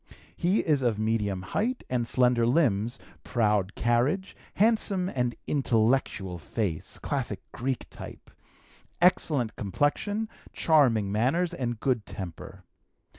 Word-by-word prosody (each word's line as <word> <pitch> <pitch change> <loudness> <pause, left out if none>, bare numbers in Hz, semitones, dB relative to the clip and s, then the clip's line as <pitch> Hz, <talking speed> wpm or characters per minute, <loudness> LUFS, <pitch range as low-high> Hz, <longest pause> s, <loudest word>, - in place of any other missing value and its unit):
He 185 - +2
is 150 -4 +1
of 120 -4 +1
medium 105 -4 -1
height 230 - -1
and 120 -2 -1
slender 125 -2 +4
limbs, 120 -4 +2 0.3
proud 105 -5 +1
carriage, 125 +11 +1 0.2
handsome 205 -4 +2
and 125 -5 -1
intellectual 115 -8 +1
face 85 - -3
(classic - - -3
Greek 130 0 -3
type), - - -10 0.7
excellent 155 - +2
complexion, 145 - -1 0.3
charming 120 -11 +3
manners, 145 - +1
and 120 -8 -3
good 125 -5 0
temper. 95 +1 -8
120 Hz, 110 wpm, -28 LUFS, 105-155 Hz, 0.7 s, slender